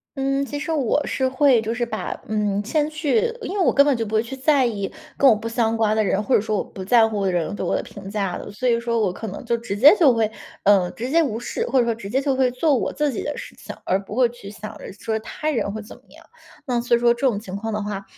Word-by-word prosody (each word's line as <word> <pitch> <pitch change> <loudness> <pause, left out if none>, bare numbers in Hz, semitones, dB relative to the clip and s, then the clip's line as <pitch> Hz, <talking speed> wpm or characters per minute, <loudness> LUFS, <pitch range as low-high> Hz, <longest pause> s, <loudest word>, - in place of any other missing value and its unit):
嗯， 275 0 0
其 290 - -5
实 315 +3 -4
我 290 -1 +1
是 260 - 0
会 260 -3 +4
就 225 +1 -3
是 240 0 -1
把， 215 -2 -4 0.2
嗯， 210 -1 0
先 300 +6 0
去 310 +6 +1 0.2
因 390 - -5
为 390 - +2
我 - - +4
根 280 0 +5
本 285 - +3
就 230 - -1
不 220 0 -3
会 220 - +3
去 265 +3 -7
在 270 0 +3
意 200 -5 -2 0.2
跟 275 - +5
我 220 - +6
不 215 +2 -5
相 230 -1 0
关 215 -1 +2
的 220 - +2
人， 195 0 +1
或 265 - -1
者 - - +5
说 215 0 -1
我 - - -1
不 190 - -9
在 225 +3 +5
乎 210 -3 -2
的 190 - +1
人 175 +2 -1
对 - - -4
我 - - 0
的 - - -1
评 195 -1 -10
价 200 -3 -2
的。 - - -7
所 250 +5 -3
以 235 -1 +3
说 235 -1 -1
我 195 -4 +1
可 220 - -7
能 205 +6 -7
就 235 0 +1
直 230 -3 -5
接 285 - +8
就 290 -7 +6
会， 220 -2 +1 0.3
呃， 195 -3 +4
直 240 - -5
接 335 - +5
无 235 -8 -1
视， 235 0 -3
或 265 - +1
者 240 - +3
说 235 - +1
直 220 -3 -9
接 260 - +1
就 275 -1 0
会 260 -1 +3
做 275 +4 +1
我 245 - -1
自 295 -1 0
己 - - -3
的 - - -4
事 - - -9
情， - - -9
而 190 +2 0
不 210 - -7
会 250 0 +4
去 235 -4 -11
想 215 0 -9
着 - - -9
说 220 +2 -3
他 300 +7 -3
人 230 -7 -1
会 220 +1 -6
怎 210 - -12
么 - - -20
样。 - - -17 0.4
那 245 -3 0
所 235 0 +2
以 - - -4
说 235 0 +4
这 240 - -13
种 220 -5 0
情 195 -3 -8
况 225 +3 -4
的 210 -1 -2
话， 205 -1 -4
230 Hz, 325 characters per minute, -22 LUFS, 210-265 Hz, 0.4 s, 接